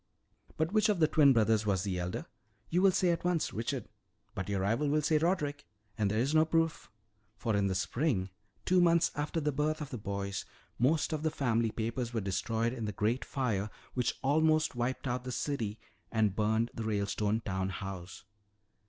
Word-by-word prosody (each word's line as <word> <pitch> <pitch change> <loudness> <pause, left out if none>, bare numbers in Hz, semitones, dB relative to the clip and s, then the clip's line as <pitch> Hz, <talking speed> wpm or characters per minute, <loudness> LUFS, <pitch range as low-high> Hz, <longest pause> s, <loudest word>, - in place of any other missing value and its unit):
"But 160 +2 0
which 215 0 +4
of 205 -4 +2
the 155 - +5
twin 150 -3 +5
brothers 110 -3 +3
was 95 -3 +1
the 95 -3 -2
elder? 90 0 -3 0.5
You 175 +2 +3
will 195 - +7
say 185 -1 +2
at 170 - -2
once, 175 -2 0
Richard. 115 +3 -3 0.5
But 95 +1 -4
your 100 -2 0
rival 115 +9 +1
will 150 +1 +2
say 155 +1 +3
Roderick. 150 -4 0 0.3
And 105 -2 +1
there 110 - 0
is 130 +6 +1
no 155 0 +6
proof. 165 0 0 0.5
For 110 -1 -1
in 100 -1 +2
the 95 - -1
spring, 100 - 0 0.3
two 185 0 +4
months 170 -1 +4
after 150 +3 -2
the 150 -1 0
birth 150 +2 0
of 150 -3 -6
the 125 - -4
boys, 100 -1 -3 0.4
most 150 +6 +2
of 155 - -2
the 160 - +1
family 115 -6 +1
papers 115 +2 -3
were - - +2
destroyed 110 +4 -1
in 115 -4 -4
the 105 - -2
great 110 +5 0
fire 110 -7 -1 0.2
which 125 -1 0
almost 155 +2 +3
wiped 125 +2 -2
out 125 0 -2
the 125 - -5
city 115 -5 -2 0.3
and 110 -4 +2
burned 110 +2 +1
the - - -5
Ralestone 105 0 0
town 95 -3 -2
house. 95 -1 -7
120 Hz, 195 wpm, -32 LUFS, 105-155 Hz, 0.5 s, will